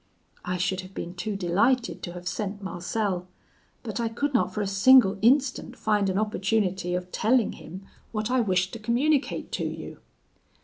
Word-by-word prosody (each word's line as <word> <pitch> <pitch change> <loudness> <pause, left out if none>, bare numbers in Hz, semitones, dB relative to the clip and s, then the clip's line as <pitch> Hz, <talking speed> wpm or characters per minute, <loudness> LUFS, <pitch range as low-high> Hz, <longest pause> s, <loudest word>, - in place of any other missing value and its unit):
I 180 0 -2
should 185 +1 -1
have 185 +1 -13
been 175 - -5
too 205 +3 -4
delighted 205 +7 +1
to 175 - -6
have 180 0 -8
sent 205 +2 -3
Marcel, 185 0 -2 0.6
but 220 -3 -4
I 230 -1 0
could 280 +5 -2
not 185 -7 +2
for 210 - -3
a - - -2
single 200 0 +5
instant 260 +3 +2
find 210 -2 +1
an 190 - -1
opportunity 195 -3 0
of 180 0 -4
telling 230 0 +2
him 185 +5 -10 0.3
what 215 +1 -2
I 255 - +3
wished 185 -3 +1
to 230 - -6
communicate 260 +7 0
to - - -2
you.' - - -6
200 Hz, 175 wpm, -26 LUFS, 185-230 Hz, 0.6 s, single